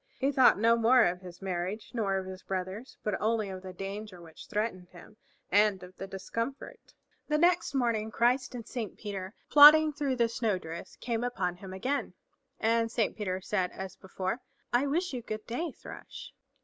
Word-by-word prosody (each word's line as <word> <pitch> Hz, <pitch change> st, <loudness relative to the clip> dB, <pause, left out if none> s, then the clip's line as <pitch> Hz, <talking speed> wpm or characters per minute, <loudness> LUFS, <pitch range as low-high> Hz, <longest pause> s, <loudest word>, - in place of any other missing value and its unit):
He 275 Hz, +1 st, +1 dB
thought 260 Hz, -6 st, +6 dB
no 230 Hz, +2 st, +4 dB
more 235 Hz, +2 st, +5 dB
of 180 Hz, +1 st, -1 dB
his 180 Hz, 0 st, -11 dB
marriage, 185 Hz, +3 st, -3 dB
nor 200 Hz, -5 st, 0 dB
of 190 Hz, -, -3 dB
his 185 Hz, 0 st, -8 dB
brother's, 190 Hz, +6 st, -5 dB
but 210 Hz, -, -1 dB
only 220 Hz, -1 st, +1 dB
of 185 Hz, -1 st, -6 dB
the 185 Hz, 0 st, -8 dB
danger 195 Hz, +1 st, -6 dB
which 165 Hz, -2 st, -13 dB
threatened 205 Hz, -4 st, -2 dB
him, 175 Hz, +4 st, -15 dB, 0.4 s
and 205 Hz, -2 st, +3 dB
of 180 Hz, +1 st, -12 dB
the 195 Hz, -, -7 dB
discomfort. 230 Hz, -, -6 dB, 0.3 s
The 300 Hz, -, +2 dB
next 345 Hz, -2 st, +2 dB
morning 230 Hz, -4 st, +1 dB
Christ 245 Hz, +4 st, +1 dB
and 230 Hz, -3 st, -7 dB
Saint 225 Hz, -6 st, -5 dB
Peter, 195 Hz, -1 st, -6 dB, 0.2 s
plodding 305 Hz, +1 st, +9 dB
through 285 Hz, -3 st, -1 dB
the 235 Hz, -2 st, +3 dB
snow 225 Hz, -3 st, 0 dB
drifts, 165 Hz, -1 st, -8 dB
came 235 Hz, -1 st, -2 dB
upon 185 Hz, -8 st, -2 dB
him 190 Hz, 0 st, -9 dB
again, 255 Hz, +10 st, -2 dB, 0.4 s
and 230 Hz, 0 st, +2 dB
Saint 230 Hz, -3 st, 0 dB
Peter 190 Hz, -3 st, -3 dB
said 185 Hz, -1 st, 0 dB
as 190 Hz, 0 st, -7 dB
before, 190 Hz, +3 st, -4 dB, 0.3 s
"I 255 Hz, +4 st, +3 dB
wish 340 Hz, +3 st, 0 dB
you 250 Hz, -, -3 dB
good 215 Hz, -1 st, -6 dB
day, 310 Hz, +8 st, -3 dB
Thrush." -, -, -10 dB
215 Hz, 185 wpm, -30 LUFS, 190-245 Hz, 0.4 s, plodding